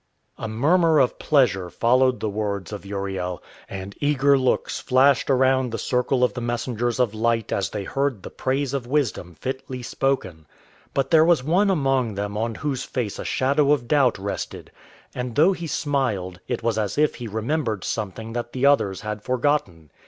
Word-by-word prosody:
A 115 - -4
murmur 160 +9 +3
of 130 -4 +2
pleasure 100 - +2
followed 125 +6 +2
the 110 - -1
words 100 -2 -3
of 100 -1 -7
Uriel, 95 -3 -4 0.3
and 95 +1 -6
eager 140 -1 +3
looks 130 -2 0
flashed 135 +1 +3
around 130 -1 +3
the 115 - -3
circle 125 +1 0
of 125 -5 +2
the 125 - -5
messengers 120 0 -2
of 120 -4 +2
light 115 0 0
as 95 -4 0
they 105 -2 -4
heard 135 -2 -2
the - - -8
praise 135 +1 -1
of 130 -4 -3
wisdom 120 - -1
fitly 130 - -5
spoken. 95 - -2 0.5
But 135 -1 0
there 160 -1 +7
was 165 -5 +3
one 185 +8 +2
among 135 - +1
them 100 +1 -3
on 115 +1 -2
whose 135 -4 -3
face 115 -6 -4
a - - -4
shadow 140 +2 +2
of 120 -5 -2
doubt 140 -5 +3
rested, 100 +1 -5 0.4
and 125 -2 -4
though 165 +8 +5
he 170 -2 -6
smiled, 125 - -1
it 120 -2 -3
was 115 -2 0
as 105 +3 -2
if 150 0 +3
he 120 - -4
remembered 110 - -2
something 110 +1 -4
that 120 0 -4
the 130 +1 0
others 105 -9 +3
had 105 -1 -5
forgotten. 125 - -1
125 Hz, 180 wpm, -23 LUFS, 105-140 Hz, 0.5 s, there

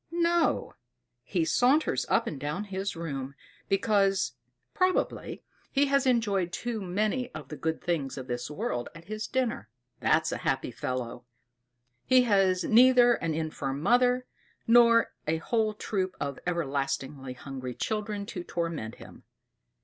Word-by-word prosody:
No; 340 0 +1 0.5
he 175 -5 -1
saunters 250 - +2
up - - +3
and 145 - -5
down 150 +8 -3
his 195 -1 -4
room, 140 -5 -5 0.3
because, 195 - +2 0.4
probably, 370 0 0 0.3
he 280 0 +3
has 275 -1 +2
enjoyed 205 -8 +1
too 235 +2 -3
many 215 +7 -1
of - - -8
the 150 - -6
good 160 +1 -3
things 155 -7 -1
of 130 - -5
this 120 0 -4
world 125 -5 -3
at 165 0 -12
his 215 +1 -4
dinner. 245 - -1 0.3
That's - - +2
a - - -2
happy - - -1
fellow! 125 -1 -4 0.8
He 255 -1 +5
has 195 -5 +3
neither 245 +1 +6
an 165 -8 -2
infirm 145 -4 -3
mother, 245 +4 +3 0.4
nor 235 0 +5
a 160 +1 +1
whole 215 +5 0
troop 190 -3 -2
of 140 -2 -3
everlastingly 135 -4 -2
hungry 130 -1 -7
children 210 -2 -3
to 180 -3 -6
torment 165 -11 -3
him. - - -13
190 Hz, 140 wpm, -28 LUFS, 145-235 Hz, 0.8 s, neither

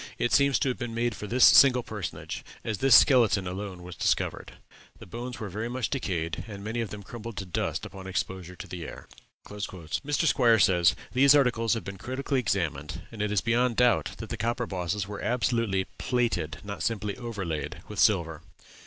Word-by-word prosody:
It 120 - 0
seems 140 -2 +4
to 140 - 0
have 125 - -3
been 120 -2 -4
made 120 0 0
for 105 - -7
this 125 +4 +5
single 125 -3 +7
personage, 105 -6 -6 0.2
as 110 -3 -3
this 135 -2 +6
skeleton 110 -7 +5
alone 95 0 -6
was 90 0 -9
discovered. - - -1 0.4
The - - -12
bones 120 +5 -7
were 110 - -4
very 110 +5 -4
much 125 -1 -2
decayed, 90 - -2
and 100 -2 -8
many 115 +3 -2
of 115 - -3
them 105 -1 -8
crumbled 115 0 -8
to 100 - -4
dust 90 - -2
upon 95 -1 -9
exposure 90 -1 -4
to - - -9
the 90 -2 -7
air." - - -10 0.4
Mr. 105 - -3
Squier 120 -7 +4
says, 90 -2 +4 0.2
"These 140 +3 +6
articles 120 -5 +2
have 115 - -4
been 95 +2 -7
critically 130 +3 -2
examined, 85 - -2
and 110 -3 -6
it 105 -1 0
is 105 -4 +2
beyond 120 +2 +1
doubt 125 0 +2
that 110 - -8
the 115 - -4
copper 120 +3 -1
bosses 95 0 -3
were 105 0 -6
absolutely 115 -6 0
plated, 120 -11 -1
not 100 -4 -6
simply 105 0 -1
overlaid, 100 -11 -5
with 105 -2 -7
silver. 85 -7 +2
105 Hz, 190 wpm, -27 LUFS, 95-120 Hz, 0.4 s, single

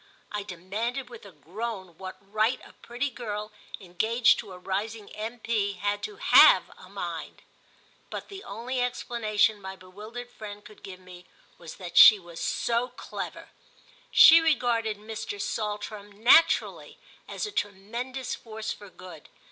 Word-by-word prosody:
I 210 - -3
demanded 215 +8 -4
with 225 -3 -11
a - - -13
groan 190 +3 -7
what 185 -1 -8
right 215 +4 0
a - - -16
pretty 250 +4 -4
girl 215 -3 -5 0.3
engaged 220 +6 +2
to 205 - -8
a 180 - -9
rising 205 +3 -4
M.P. 220 -2 -2
had 205 +2 -2
to 420 - -6
have - - +7
a - - -15
mind; - - -6 0.7
but - - -6
the 395 -1 -10
only 240 +5 -4
explanation 220 -4 0
my 190 0 -7
bewildered 215 +6 -10
friend 205 -3 -10
could 215 - -15
give 190 -2 -10
me 180 -1 -14 0.3
was 165 -2 -10
that 180 -2 -7
she 215 - +11
was 175 -3 -11
so 235 +1 0
clever. - - -8 0.6
She 330 +1 +9
regarded 235 -9 +1
Mr. 215 -1 -6
Saltram 210 0 -4
naturally 235 +11 +3 0.3
as - - -4
a 420 - -6
tremendous 240 - -4
force 220 -1 -6
for 205 - -13
good. 180 -5 -13
215 Hz, 145 wpm, -27 LUFS, 195-235 Hz, 0.7 s, she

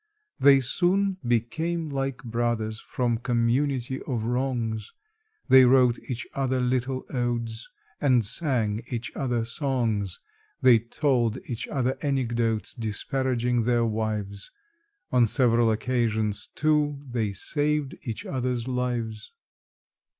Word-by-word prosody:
They 140 -1 +7
soon 190 +8 +1
became 160 +8 0
like 135 -2 -3
brothers 115 -2 -1
from 120 -3 -1
community 125 +2 0
of 120 -5 -3
wrongs: 120 -3 -2 0.6
They 130 0 +8
wrote 125 -1 +5
each 120 -2 -3
other 130 -1 0
little 130 +1 -1
odes 120 -2 -2 0.3
and 125 -6 +3
sang 115 - 0
each 120 -1 -5
other 120 -4 -1
songs; 115 - -1 0.4
They 125 -3 +6
told 120 -1 0
each 120 -1 -5
other 130 -2 -1
anecdotes 120 -5 0
disparaging 120 +1 -1
their 120 -1 +2
wives; 105 -2 -3 0.6
On 125 -2 +4
several 120 -1 +3
occasions, 110 -2 0
too, 150 -2 +1
they 115 -5 -1
saved 145 - -1
each 115 -4 -5
other's 125 -2 -2
lives. 120 -4 -3
120 Hz, 110 wpm, -26 LUFS, 115-130 Hz, 0.6 s, They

